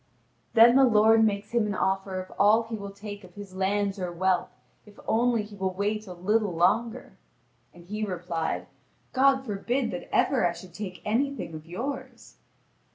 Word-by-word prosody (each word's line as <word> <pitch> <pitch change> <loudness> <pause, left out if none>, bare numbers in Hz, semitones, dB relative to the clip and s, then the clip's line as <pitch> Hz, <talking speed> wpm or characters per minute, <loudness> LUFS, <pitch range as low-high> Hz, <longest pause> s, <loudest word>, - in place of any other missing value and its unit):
Then 235 +3 +8
the 270 - +6
lord 225 -2 +5
makes 205 -1 0
him 235 -3 +1
an 205 - -2
offer 190 0 -1
of 185 - -8
all 215 +3 +5
he 225 0 -6
will 200 -2 -6
take 205 +1 -9
of 180 -1 -15
his 200 -2 -10
lands 200 +1 0
or 180 -1 -3
wealth, 185 +1 0 0.3
if 210 -1 -18
only 235 -1 +2
he 210 0 -11
will 190 -2 -2
wait 210 +2 -2
a 180 - -7
little 200 +1 0
longer. 215 +2 0 0.5
And 175 -1 -16
he 210 +3 -4
replied: 175 -4 -3 0.5
"God 265 0 +3
forbid 235 +3 -1
that 265 - -6
ever 250 -10 +3
I 170 - -2
should 180 0 -12
take 185 -2 -7
anything 260 -3 -1
of 155 +1 -9
yours!" 255 +11 -6
205 Hz, 175 wpm, -27 LUFS, 185-225 Hz, 0.5 s, Then